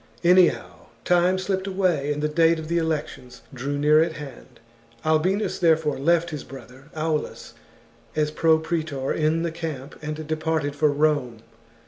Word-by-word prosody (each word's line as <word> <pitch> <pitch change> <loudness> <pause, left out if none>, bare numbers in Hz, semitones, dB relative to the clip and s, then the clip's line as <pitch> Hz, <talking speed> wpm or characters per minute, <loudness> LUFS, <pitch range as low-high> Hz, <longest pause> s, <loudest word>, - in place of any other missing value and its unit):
Anyhow, 180 +1 +3 0.2
time 180 +1 +3
slipped 190 0 -2
away, 180 -7 0
and 150 0 -3
the - - +2
date 165 +2 +3
of 160 0 -7
the 170 0 +1
elections 145 -6 -4
drew 135 +3 -3
near 150 +2 +4
at 165 0 0
hand. 145 -4 -11 0.5
Albinus, 180 +7 +1
there 165 -3 +4
fore, 150 -4 -3
left 170 +3 +2
his 150 -3 -5
brother 135 0 -13
Aulus 155 -1 -3 0.6
as 150 -1 0
pro 160 +1 +3
praetor 155 -4 -2
in 160 +1 0
the 170 - -2
camp, 160 -4 -6
and 155 +1 -5
departed 155 -2 -1
for 150 0 +2
Rome. 145 -6 0
155 Hz, 155 wpm, -24 LUFS, 145-170 Hz, 0.6 s, near